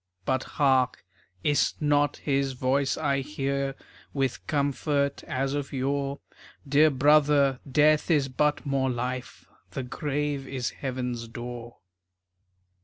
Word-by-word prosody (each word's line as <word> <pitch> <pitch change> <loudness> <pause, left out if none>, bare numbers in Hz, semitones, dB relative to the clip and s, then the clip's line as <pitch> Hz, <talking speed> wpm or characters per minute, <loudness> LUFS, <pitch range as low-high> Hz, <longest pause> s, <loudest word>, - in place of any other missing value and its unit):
But, 130 0 +1
hark! 130 -7 +2 0.4
Is 145 -1 +2
't 150 - -5
not 145 0 +2
his 140 -2 0
voice 135 +2 0
I 140 -3 +1
hear, 140 -1 -2 0.4
With 135 -3 -1
comfort 140 0 0
as 135 +1 -1
of 145 -1 -3
yore? 140 +1 -2 0.5
"Dear 145 +3 +5
brother, 140 -1 +4
Death 155 +3 +4
is 145 -5 +3
but 150 +4 0
more 135 -1 +1
Life, 125 +1 -4 0.2
The 135 - -4
grave 145 +1 -2
is 130 -3 -3
heaven's 125 -3 -4
door." 120 0 -8
140 Hz, 120 wpm, -27 LUFS, 130-145 Hz, 0.5 s, Dear